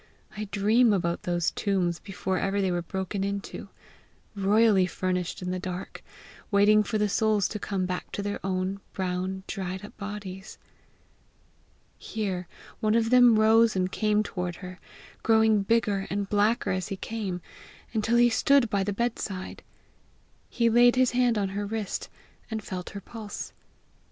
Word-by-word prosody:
I 215 0 -4
dream 215 +3 +3
about 170 -3 0
those 175 -1 0
tombs 180 -4 0
before 190 -1 -3
ever 195 +1 0
they 190 -2 +1
were 175 0 0
broken 190 +3 -3
into 200 0 -4 0.7
royally 200 -1 +4
furnished 180 0 -2
in 180 - -2
the 185 - -2
dark, 180 0 -6 0.5
waiting 210 +1 +5
for 215 +1 -1
the 210 0 +2
souls 210 -2 +2
to 210 - -5
come 195 -2 -2
back 180 0 -4
to 200 - -3
their 205 0 -4
old, 190 +1 -1
brown, 185 0 -3
dried 190 -1 -5
up - - -13
bodies!" 200 -2 -7 1.4
Here 190 -5 -3 0.3
one 215 -1 +2
of 230 0 +2
them 245 -3 +7
rose 220 0 +5
and 185 0 0
came 210 0 +1
toward 180 -4 -4
her, 185 0 -9 0.4
growing 220 -2 +4
bigger 205 -2 +1
and 200 0 -2
blacker 210 +3 +2
as 185 -1 -2
he 195 - -4
came, 200 -4 -4 0.5
until 225 +1 +2
he 240 0 +5
stood 265 0 +3
by 200 -1 +1
the 205 +1 -2
bedside. 205 -4 -3 0.9
He 235 -1 +1
laid 240 +2 +5
his 255 -1 +3
hand 245 -2 +2
on 200 -2 0
her 205 +1 -3
wrist, 215 -2 -4 0.4
and 220 -2 -4
felt 180 -2 -5
her 200 - -8
pulse. 215 0 -7
200 Hz, 155 wpm, -27 LUFS, 185-220 Hz, 1.4 s, them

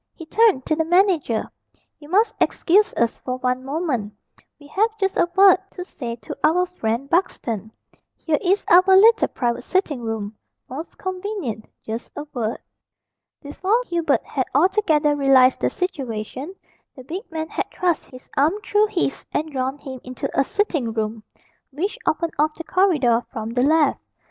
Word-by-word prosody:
He 330 - -10
turned 405 - +3
to 310 - +1
the 320 - +1
manager. 340 - +2 0.5
"You 295 0 -14
must 425 +5 +3
excuse 410 +5 +3
us 235 -1 +1
for 255 0 -4
one 255 0 -1
moment, 270 - -2 0.5
we 290 - -16
have 435 +9 0
just 385 -1 0
a 345 - +2
word 385 -1 +7 0.2
to 360 - -6
say 240 -9 -6
to 235 - -8
our 360 +4 +3
friend 255 -7 -3
Buxton. 230 - -1 0.5
Here 310 -3 0
is 390 +2 +1
our 355 - +8 0.2
little 450 +4 +6
private 240 -2 -2
sitting 325 -9 -1
room 220 -2 -4 0.3
most 300 +7 -8
convenient 370 - -4 0.2
just 225 +2 -5
a 295 - -5
word." 230 -3 -2 0.9
Before 380 +10 0
Hubert 335 -6 0
had 260 -3 -2
altogether 315 -3 +3
realised 270 -2 +5
the - - +1
situation, 270 - -4 0.4
the 260 - -11
big 360 - -7
man 315 -1 -4
had - - -3
thrust 350 -4 -1
his 255 0 -14
arm 295 +5 +3
through 420 +1 +3
his, 355 -9 -2
and 310 +1 -2
drawn 265 0 -2
him 265 -3 -9
into 255 0 -5
a 275 - +3
sitting 300 - -1
room 220 0 -3 0.5
which 390 - -3
opened 330 +1 0
off 305 +1 +2
the 330 - -7
corridor 295 -12 +2
from 220 0 -5
the 245 +1 0
left. 300 +1 +3
300 Hz, 165 wpm, -22 LUFS, 255-365 Hz, 0.9 s, our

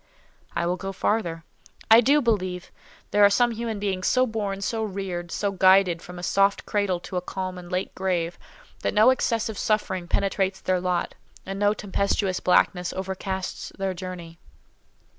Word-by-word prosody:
I 170 0 0
will 180 +1 0
go 195 +2 -5
farther. 175 -5 -1 0.5
I 225 +1 +9
do 285 +4 +4
believe 185 -6 -1 0.4
there 205 - +4
are 200 - +8
some 240 +4 +3
human 230 -1 -3
beings 195 -2 -2
so 255 0 +4
born, 205 -4 -3
so 220 +2 -1
reared, 185 -4 -4
so 200 -1 -1
guided 185 -2 +4
from 180 0 -10
a 175 - -8
soft 195 +2 +2
cradle 200 -4 0
to 185 - -5
a - - 0
calm 185 0 -5
and 175 0 -11
late 185 +1 -2
grave, 175 -3 -2 0.4
that - - -2
no 220 +5 +7
excessive 225 -4 -1
suffering 190 -5 -1
penetrates 195 0 0
their 185 -1 0
lot, 180 -1 -1 0.3
and 195 +1 -5
no 205 +1 +3
tempestuous 200 -2 -1
blackness 180 0 +2
overcasts 190 0 -4
their 195 -1 -1
journey. 175 -2 -8
190 Hz, 165 wpm, -25 LUFS, 180-205 Hz, 0.5 s, I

